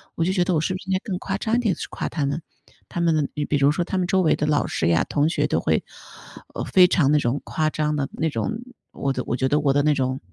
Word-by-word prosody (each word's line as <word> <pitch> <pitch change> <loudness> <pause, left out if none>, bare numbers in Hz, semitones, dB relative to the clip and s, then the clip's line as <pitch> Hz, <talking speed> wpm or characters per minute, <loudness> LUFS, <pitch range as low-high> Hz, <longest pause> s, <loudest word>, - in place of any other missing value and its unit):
我 165 - 0
就 185 - +1
觉 180 -2 +2
得， 180 -1 0
我 - - +2
是 175 +4 -1
不 185 - -4
是 195 - -11
应 - - +1
该 185 - +2
更 190 -4 -3
夸 195 0 -3
张 220 +2 -1
一 - - +2
点 215 -7 +1
去 - - -5
夸 - - -3
他 150 -4 -2
们。 140 +4 -2 0.5
他 - - -4
们 160 -4 +2 0.2
比 - - 0
如 140 +1 +4
说， 170 +3 -1
他 190 - -2
们 180 - 0
周 190 0 +2
围 165 - +3
的 150 - -1
老 150 -1 +2
师 80 - -1
呀， 85 -1 +3
同 145 +2 +1
学 - - 0
都 - - 0
会 - - +1 0.7
呃， - - -3
非 180 -1 +6
常 150 -6 +2
那 150 - +4
种， 130 +1 0
夸 155 -1 0
张 150 0 -1
的 140 -2 -2
那 160 - -1
种， 150 - -2 0.4
我 135 -1 -2
的 125 - -3
我 - - 0
觉 130 - +1
得 145 +3 +2
我 145 -1 +2
的 145 - +3
那 150 0 +3
种 130 -1 -1
155 Hz, 320 characters per minute, -23 LUFS, 140-180 Hz, 0.7 s, 非